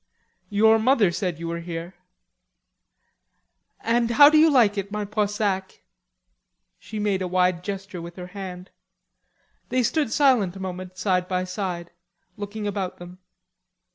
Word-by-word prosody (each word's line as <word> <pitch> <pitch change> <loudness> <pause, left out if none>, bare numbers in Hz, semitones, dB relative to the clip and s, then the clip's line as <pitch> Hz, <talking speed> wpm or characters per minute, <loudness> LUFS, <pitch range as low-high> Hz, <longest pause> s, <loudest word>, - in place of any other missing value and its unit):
"Your 220 +2 +4
mother 225 -5 +3
said 180 -3 -2
you 165 0 -6
were 170 0 -3
here." 170 +1 -6 1.9
"And 235 +1 +1
how 285 +5 +8
do 310 - +5
you 320 +1 +6
like 235 -8 +4
it, 200 0 -4
my 210 0 -3
Poissac?" 205 -2 -2 1.0
She 215 - -8
made 205 -2 0
a 185 - -1
wide 180 -1 +1
gesture 195 -2 -6
with 170 +1 -9
her 180 - -7
hand. 185 -2 -8 1.0
They 255 0 +1
stood 290 0 0
silent 245 -11 +3
a - - -8
moment, 185 -1 -6
side 185 -1 0
by 185 0 -1
side, 180 -2 -4 0.4
looking 205 +1 -6
about 200 -3 -3
them. 175 +1 -11
195 Hz, 140 wpm, -24 LUFS, 180-215 Hz, 1.9 s, how